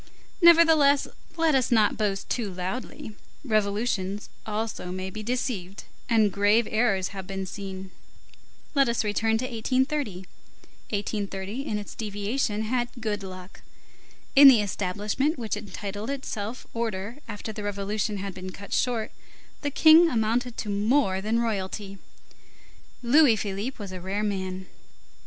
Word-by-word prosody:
Nevertheless, 320 -4 +6 0.3
let 325 -2 +3
us 260 -3 +2
not 220 -3 +4
boast 200 -2 -1
too 220 -5 -2
loudly; 190 +4 -5 0.3
revolutions 210 -2 -1 0.2
also 215 -4 -3
may 185 +1 -4
be 215 - -6
deceived, 215 -5 -3 0.3
and 220 -3 +4
grave 205 +4 +3
errors 205 -4 +1
have 190 -2 -8
been 195 -1 -4
seen. 190 0 -7 0.8
Let 275 -4 +3
us 235 - 0
return 220 +1 +1
to 250 - -2
1830. 255 - -1 0.6
1830, 205 +3 -3
in 210 - -1
its 205 - -7
deviation, 210 +1 -2
had 240 +2 -1
good 215 -3 -2
luck. 185 -1 -10 0.7
In 280 +1 +10
the 240 -6 +7
establishment 205 - -1
which 225 -4 -2
entitled 205 +1 -6
itself 250 -4 -5
order 230 +1 -3
after 220 0 -6
the 210 - -6
revolution 205 +1 -2
had 195 0 -5
been 185 0 -7
cut 200 +2 -9
short, 235 -4 0 0.5
the 290 - -1
King 320 +4 +7
amounted 235 0 0
to 210 - -4
more 205 -1 +2
than 220 +3 0
royalty. 200 -3 -3 1.0
Louis 260 0 +6
Philippe 205 +5 -3
was 200 -3 -7
a 185 -1 -7
rare 195 +3 -2
man. 190 -2 -3
215 Hz, 135 wpm, -26 LUFS, 195-245 Hz, 1.0 s, In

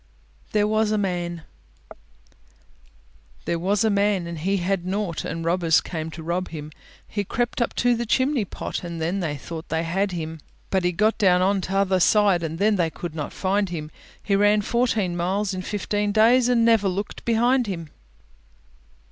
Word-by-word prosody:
THERE 210 -1 +2
WAS 215 0 +1
A 215 - +1
MAN 175 -4 -2 2.0
There 170 - -1
was 200 +5 +1
a 220 - +3
man, 200 -2 +1
and 170 -1 -6
he 195 +5 0
had 185 0 -1
nought, 185 -2 -2
And 165 0 -4
robbers 170 -2 +3
came 160 -2 -5
to 160 0 -9
rob 175 +3 -2
him; 155 -2 -7 0.4
He 205 - -2
crept 240 +5 -2
up 235 - -1
to 245 0 +3
the 235 0 -3
chimney 260 0 +2
pot, 190 - -5
And 170 -1 -5
then 170 +5 -1
they 155 -5 -2
thought 160 +4 -8
they 160 0 0
had 190 +4 0
him; 160 -2 -5 0.3
But 190 -1 +1
he 180 - +3
got 215 +5 +1
down 180 -3 +4
on 195 +1 +2
t'other 190 0 +1
side, 200 -1 +4
And 165 -1 -4
then 205 +2 +2
they 170 -2 +1
could 170 0 -7
not 155 -2 -4
find 195 +1 0
him; 155 -3 -5 0.3
He 200 - +1
ran 205 +1 +4
fourteen 225 -6 0
miles 190 +3 -1
in 185 - -3
fifteen 205 +1 -1
days, 235 +4 +4
And 235 -2 +3
never 225 -3 +4
looked 195 +2 -4
behind 240 +2 +2
him. 165 -6 -5
190 Hz, 180 wpm, -24 LUFS, 170-210 Hz, 2.0 s, down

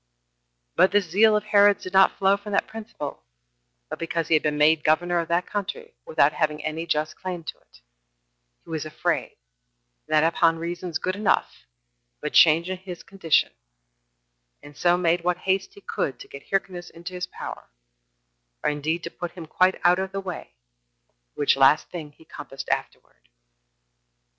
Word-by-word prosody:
But - - +5
this 205 -2 +2
zeal 210 +6 +4
of 210 - -3
Herod's 205 -1 +4
did 185 - -7
not 190 0 +5
flow 195 0 +4
from 200 +1 -8
that - - +2
principle, 215 - -8 0.7
but - - -7
because 165 -1 -2
he - - +3
had 155 - +5
been 150 -1 -1
made 150 +1 +4
governor 175 +3 +2
of 165 - -2
that 170 +2 +1
country 335 - -5
without 485 - +3
having 150 -1 -1
any 160 +2 -3
just 155 -1 -1
claim 180 -2 -6
to - - -8
it, - - -24 0.8
he - - -13
was 160 -2 -2
afraid, 155 -1 -2 0.7
and - - -4
that 155 - +5
upon 165 0 +3
reasons 170 0 -4
good 185 0 -2
enough, 205 - 0 0.5
of - - -37
a - - 0
change 165 +1 +5
in 185 0 -3
his 180 -1 -9
condition, 190 -5 +1 1.1
and 145 0 -13
so 175 +3 +3
made 170 -1 +1
what 180 0 +1
haste 190 +1 -1
he 200 - -14
could 130 -9 -3
to - - -11
get 140 - -12
Hyrcanus 190 -3 -2
into 170 +2 -9
his 180 0 -4
power, - - -9 0.9
or - - +2
indeed 155 +3 -2
to 170 - -6
put 175 -1 -6
him 170 -3 -9
quite 185 +4 +2
out 175 +1 +4
of 190 0 -4
the 195 - -2
way; 180 - -7 0.8
which 145 - +3
last 135 +2 +4
thing 155 -4 -7
he 160 - -21
compassed 135 -3 -9
afterward. - - -4
175 Hz, 175 wpm, -24 LUFS, 155-190 Hz, 1.1 s, But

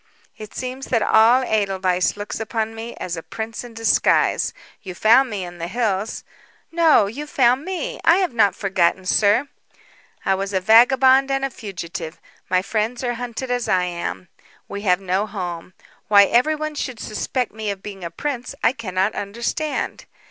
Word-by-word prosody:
"It 215 -1 -11
seems 255 +1 -5
that 230 -3 +1
all 235 +4 +5
Edelweiss 190 -4 0
looks 205 0 -5
upon 220 0 -2
me 225 +1 -7
as 175 -1 -5
a 165 - -6
prince 225 +7 -6
in 240 -2 -11
disguise. 225 -1 +2 0.3
You 185 -3 -8
found 235 +7 +5
me 200 -4 -4
in 175 0 -10
the 170 - -3
hills 210 0 -2 0.2
" - - -34
"No; 330 -9 +4
you 275 +9 -6
found 255 -1 +2
me. 375 -1 -4
I 330 - +5
have 370 -8 0
not 205 -4 +3
forgotten, 185 -2 0
sir." 210 +8 +3 0.8
"I 195 - +3
was 195 +1 -3
a 190 - +2
vagabond 260 +6 +5
and 270 0 0
a 270 - -4
fugitive. 175 -6 -7 0.3
My 185 0 +2
friends 220 +4 -2
are 245 -1 0
hunted 245 +1 -5
as 245 -1 -1
I 185 -1 +3
am. 95 - -5 0.4
We 200 - -6
have 180 -3 +2
no 190 +2 -1
home. 180 -4 -6 0.3
Why 200 -1 +7
everyone 310 +7 +1
should 255 -5 -5
suspect 245 +3 -3
me 215 -1 -5
of 195 -1 -5
being 195 -3 -8
a 170 - -4
prince 250 - -5
I 230 - +4
cannot 195 -4 -1
understand. 235 +10 -3
220 Hz, 175 wpm, -21 LUFS, 190-250 Hz, 0.8 s, Why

